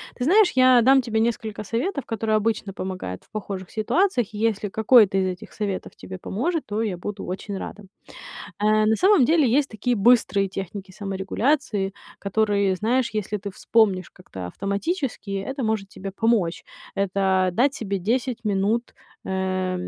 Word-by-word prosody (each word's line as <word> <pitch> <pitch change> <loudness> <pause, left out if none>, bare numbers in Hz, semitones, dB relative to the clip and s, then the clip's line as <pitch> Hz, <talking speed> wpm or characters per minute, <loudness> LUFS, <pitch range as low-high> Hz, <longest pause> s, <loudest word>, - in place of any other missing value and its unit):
Ты 245 - -3
знаешь, 395 +5 +5
я 255 -1 +6
дам 265 +3 +5
тебе 225 -3 -1
несколько 220 -2 -2
советов, 255 - -2
которые 220 -1 -1
обычно 215 -2 -1
помогают 185 - -5
в - - -30
похожих 195 -3 -6
ситуациях, 245 - +1
и 210 - -6
если 215 -2 0
какой-то 215 -2 +5
из 190 - +2
этих 185 -1 -6
советов 200 -3 -4
тебе 185 0 -9
поможет, 300 - -2
то 210 +2 -2
я 195 -5 -2
буду 205 +3 -6
очень 195 +2 -5
рада. 205 +2 -7 0.8
Э, 215 0 +3
на 220 - +3
самом 380 - +5
деле 315 -1 +4
есть 275 +4 +2
такие 235 +3 -1
быстрые 200 -3 +3
техники 195 0 -7
саморегуляции, 200 +2 -1 0.3
которые, 200 -1 +1
знаешь, 235 +5 +1
если 210 0 -2
ты 200 +1 -6
вспомнишь 195 -2 +1
как-то 95 - -9
автоматически, 200 - -3
это 265 +7 -4
может 220 -3 -1
тебе 195 0 -7
помочь. 200 -4 0 0.3
Это- 190 -1 +1
дать 270 +9 +2
себе 200 -3 -3
10 240 +5 -1
минут, 210 +3 0 0.3
эм, 185 -1 -1
210 Hz, 155 wpm, -24 LUFS, 195-235 Hz, 0.8 s, я